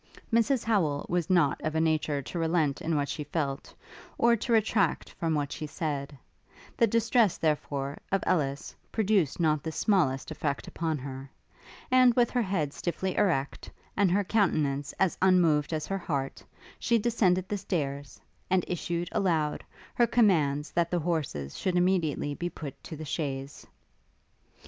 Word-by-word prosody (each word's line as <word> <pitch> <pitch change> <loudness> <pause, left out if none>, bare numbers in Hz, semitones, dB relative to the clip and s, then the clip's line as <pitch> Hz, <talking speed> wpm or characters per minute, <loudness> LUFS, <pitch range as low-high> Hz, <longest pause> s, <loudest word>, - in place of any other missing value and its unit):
Mrs 235 +2 +3
Howel 165 -11 +1
was 175 -2 0
not 170 -7 +3
of 155 0 -2
a - - +2
nature 155 -3 +1
to 170 - -5
relent 160 -4 +1
in 165 0 -1
what 145 -1 0
she 150 - -4
felt, 145 -2 -3 0.5
or 235 0 +4
to 235 +2 -4
retract 215 -5 +2
from 165 -2 -1
what 145 -1 -1
she 155 - -5
said: 145 -3 -4 0.6
the 230 - +4
distress, 230 -2 +2
therefore, 145 -3 -1
of 195 -1 +1
Ellis, 140 -6 -1 0.2
produced 200 -9 +1
not 155 -3 +2
the 160 - -4
smallest 155 -8 +1
effect 140 -2 -3
upon 160 -2 -2
her; 135 0 -7 0.6
and, 255 -2 +6
with 240 -2 +3
her 250 - +1
head 180 -9 -1
stiffly 185 +2 -3
erect, 160 -10 0 0.3
and 200 -2 +3
her 200 +3 +2
countenance 150 -9 +1
as 190 -3 +1
unmoved 170 -6 +4
as 155 -2 -2
her 195 +3 -3
heart, 140 -6 -3 0.4
she 235 - +2
descended 195 -5 +1
the 205 - -2
stairs, 145 -8 -3 0.3
and 185 -1 +2
issued, 175 0 -2
aloud, 165 -8 0 0.3
her 240 - +3
commands 155 -11 +2
that 170 -1 +1
the 175 - 0
horses 150 - -2
should 185 -2 -1
immediately 175 -5 +1
be 175 +4 -3
put 140 -5 -9
to 160 - -7
the 155 - -7
chaise. 140 -2 -4
165 Hz, 160 wpm, -28 LUFS, 145-190 Hz, 0.6 s, and